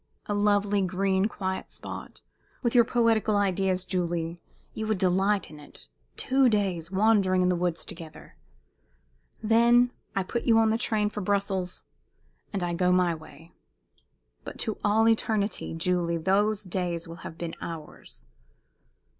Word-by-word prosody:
A 205 - -2
lovely, 205 0 +2
green, 190 +1 +1
quiet 190 -3 -4
spot! - - -9 0.4
With 235 - +1
your 240 -2 +7
poetical 225 -2 +2
ideas, 190 -2 0
Julie, 175 -2 -2 0.3
you 220 - -4
would 215 -2 +1
delight 190 +2 +1
in 150 - -11
it. 60 - -14 0.3
Two 265 -1 +3
days 190 -6 0
wandering 195 -2 +3
in 180 - +3
the 180 - +2
woods 175 -1 -1
together! 160 -2 -10 1.1
Then 235 +2 +4 0.2
I 195 - +1
put 235 +6 -3
you 225 -1 +5
into 225 -1 +4
the 225 - 0
train 210 -3 0
for 210 - -5
Brussels, 195 -2 -1 0.7
and 195 -3 -2
I 175 0 -1
go 180 +1 +2
my 180 -1 +3
way. 160 +1 -13 0.9
But - - -8
to 220 -3 -3
all 220 +2 +3
eternity, 215 -5 0
Julie, 170 0 0
those 205 +5 +1
days 175 -3 -3
will 165 0 -9
have 165 - -9
been 170 -1 -5
ours!" 155 - -9
190 Hz, 145 wpm, -27 LUFS, 175-215 Hz, 1.1 s, your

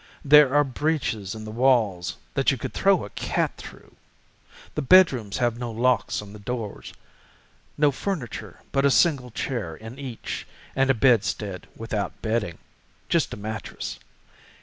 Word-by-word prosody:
There 150 -1 +7
are 145 - +6
breaches 125 - -2
in 110 0 -8
the 110 - -6
walls 110 -8 +2 0.2
that - - +2
you - - +1
could - - -5
throw - - +3
a - - -11
cat - - -1
through. - - -13 0.8
The 150 - -2
bedrooms 135 - +5
have 120 -1 0
no 120 -1 -3
locks 120 -1 +1
on 100 0 -12
the 105 - -10
doors, 110 -1 -5 0.9
no 145 -1 +4
furniture 145 - -5
but 135 - +1
a 140 - +5
single 140 -4 +3
chair 110 - -3
in 110 - -10
each, 130 -5 -6 0.3
and 135 0 +2
a 135 - +4
bedstead 105 -6 +1
without 110 -2 -4
bedding—just 110 -7 -3
a - - -12
mattress. 110 +1 -6
120 Hz, 150 wpm, -25 LUFS, 105-135 Hz, 0.9 s, There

